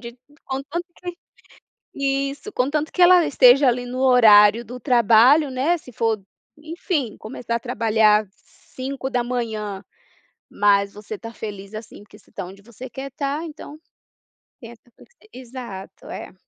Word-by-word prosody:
de 235 Hz, 0 st, -10 dB, 0.3 s
contanto 285 Hz, +6 st, -4 dB
que 355 Hz, -1 st, -7 dB, 0.8 s
isso, 275 Hz, +6 st, -2 dB
contanto 290 Hz, +5 st, -1 dB
que 365 Hz, -, -2 dB
ela 355 Hz, -1 st, +7 dB
esteja 270 Hz, -1 st, +5 dB
ali, 245 Hz, 0 st, +1 dB
no 250 Hz, +1 st, -6 dB
horário 225 Hz, -4 st, +6 dB
do 250 Hz, +2 st, -9 dB
trabalho, 245 Hz, +4 st, +4 dB
né, 280 Hz, +7 st, +1 dB
se 255 Hz, -, -15 dB
for, 220 Hz, -2 st, -1 dB, 0.4 s
enfim, 310 Hz, -, -4 dB
começar 235 Hz, +1 st, -5 dB
a 235 Hz, -, -1 dB
trabalhar 220 Hz, -3 st, +2 dB
5h, 240 Hz, -6 st, -5 dB, 0.7 s
mas 200 Hz, -1 st, +2 dB
você 210 Hz, +1 st, -9 dB
está 230 Hz, +2 st, -9 dB
feliz 205 Hz, -2 st, -8 dB
assim, 215 Hz, -1 st, -10 dB
porque 210 Hz, 0 st, -17 dB
você 200 Hz, -, -26 dB
está 195 Hz, -, -6 dB
onde 190 Hz, +2 st, -12 dB
você 240 Hz, +4 st, -11 dB
quer 270 Hz, +2 st, -7 dB
estar, 285 Hz, +2 st, -3 dB
então 300 Hz, -1 st, -10 dB, 0.8 s
tem 230 Hz, -1 st, -10 dB
essa 235 Hz, +1 st, -19 dB
flexi -, -, -21 dB, 0.2 s
exato, 240 Hz, -6 st, -10 dB
é. -, -, -8 dB
245 Hz, 140 wpm, -22 LUFS, 215-275 Hz, 0.8 s, ela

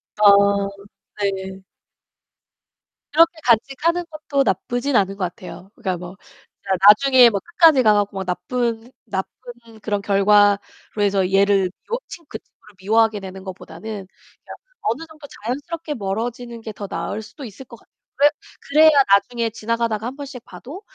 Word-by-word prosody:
아 200 Hz, -1 st, +4 dB, 0.5 s
네. 190 Hz, -1 st, -3 dB, 1.5 s
그렇게 330 Hz, +3 st, +5 dB
간직하는 275 Hz, +9 st, +1 dB
것도 295 Hz, -3 st, -1 dB
나쁘진 245 Hz, +7 st, -1 dB
않은 195 Hz, -2 st, +2 dB
것 195 Hz, -, -3 dB
같아요. 180 Hz, +2 st, -10 dB
그러니까 185 Hz, -2 st, -3 dB
뭐 180 Hz, +2 st, -10 dB, 0.4 s
진짜 195 Hz, -, -14 dB, 0.2 s
나중에 250 Hz, +3 st, +7 dB
뭐 200 Hz, -, -2 dB
끝까지 325 Hz, -, +4 dB
가 215 Hz, -1 st, +5 dB
갖고 205 Hz, -1 st, -1 dB
막 190 Hz, -, -4 dB
나쁜 230 Hz, +6 st, -3 dB
나쁜 230 Hz, +2 st, -8 dB
그런 205 Hz, -2 st, -2 dB
결과로 205 Hz, 0 st, +4 dB, 0.4 s
해서 195 Hz, -2 st, +1 dB
얘를 195 Hz, -1 st, +3 dB, 0.2 s
미워 470 Hz, -, -1 dB
친 335 Hz, -3 st, -11 dB
그 -, -, -6 dB
친구를 210 Hz, -2 st, -24 dB
미워하게 220 Hz, +1 st, +2 dB
되는 190 Hz, 0 st, -9 dB
것보다는 180 Hz, -3 st, -10 dB, 0.2 s
그냥 185 Hz, -, -16 dB, 0.3 s
어느 235 Hz, +9 st, -1 dB
정도 310 Hz, -2 st, -14 dB, 0.2 s
자연스럽게 295 Hz, +6 st, -4 dB
멀어지는 230 Hz, +3 st, -4 dB
게 220 Hz, -, -7 dB
더 200 Hz, 0 st, -7 dB
나을 210 Hz, -, -4 dB
수도 270 Hz, +6 st, -12 dB
있을 235 Hz, +4 st, -11 dB
것 235 Hz, -1 st, -13 dB
같아요. -, -, -29 dB, 0.2 s
그래 290 Hz, +2 st, +6 dB, 0.4 s
그래야 310 Hz, +2 st, +7 dB, 0.2 s
나중에 230 Hz, +3 st, +1 dB
지나가다가 230 Hz, 0 st, -2 dB
1 255 Hz, -, -6 dB
번씩 275 Hz, -4 st, -9 dB
봐도 305 Hz, +10 st, -11 dB
220 Hz, 320 characters per minute, -21 LUFS, 200-260 Hz, 1.5 s, 나중에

